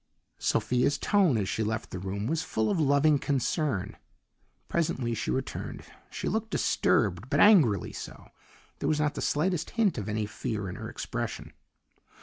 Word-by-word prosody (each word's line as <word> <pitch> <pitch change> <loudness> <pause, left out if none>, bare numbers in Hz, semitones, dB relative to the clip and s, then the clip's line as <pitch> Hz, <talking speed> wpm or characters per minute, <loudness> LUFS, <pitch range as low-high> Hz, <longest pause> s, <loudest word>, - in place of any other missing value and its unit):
Sophia's 125 +3 +1
tone 190 - +3
as 100 -3 -1
she 110 - -2
left 110 +1 -3
the 90 - -4
room 95 +3 -4
was 160 +6 0
full 110 -10 -1
of 185 - 0
loving 145 0 +4
concern. 135 -5 -1 0.7
Presently 130 -8 -1
she 110 -2 -3
returned; 130 0 -3 0.3
she - - -5
looked 220 +1 -1
disturbed, 105 - +1
but - - +1
angrily 150 - +5
so. - - -9 0.5
There - - 0
was 150 - +1
not 150 -1 +1
the - - -5
slightest 165 +2 0
hint 205 - +2
of 105 0 -5
any 105 0 -1
fear 105 0 -4
in 90 - -5
her - - -6
expression. - - -5
130 Hz, 160 wpm, -28 LUFS, 105-160 Hz, 0.7 s, angrily